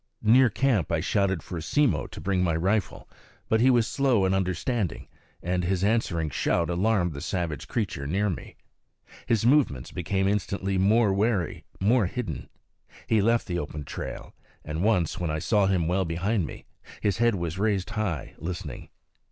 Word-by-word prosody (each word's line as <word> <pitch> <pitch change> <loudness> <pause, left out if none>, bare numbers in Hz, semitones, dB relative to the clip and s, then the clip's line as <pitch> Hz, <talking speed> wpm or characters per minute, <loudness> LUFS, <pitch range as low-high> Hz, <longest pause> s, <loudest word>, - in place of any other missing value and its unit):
Near 125 +3 +6
camp 115 - +1
I 85 - +2
shouted 95 -2 0
for 85 -2 -5
Simmo 100 - +1
to - - -10
bring 95 -2 0
my 85 -3 +1
rifle; 95 +5 -1 0.4
but 110 0 +3
he 130 - +5
was 120 -3 +4
slow 125 -5 +2
in 95 - +2
understanding, 95 - -1 0.4
and 90 +1 0
his 95 +1 0
answering 95 -8 +1
shout 85 +5 0
alarmed 90 -1 +1
the 70 - -7
savage 85 -4 -3
creature 95 - -2
near 100 +7 +1
me. 90 - -5 0.7
His 115 -2 +2
movements 120 - +2
became 95 +2 -1
instantly 100 -1 -1
more 105 +1 +4
wary, 100 -4 0
more 110 +1 +3
hidden. 95 - -5 0.6
He 110 -2 +2
left 115 +3 +2
the 85 -2 -2
open 75 -1 -5
trail; - - -7 0.3
and 75 +3 -3
once, 95 -7 +1
when 85 -2 -1
I 75 - -1
saw 100 +4 +2
him 90 -4 +1
well 95 +2 +1
behind 90 +2 -1
me, - - -10 0.3
his 100 -2 0
head 120 -2 +3
was 85 -1 -3
raised 105 -1 0
high, 105 - -3
listening. 85 -5 -6
95 Hz, 170 wpm, -26 LUFS, 85-110 Hz, 0.7 s, Near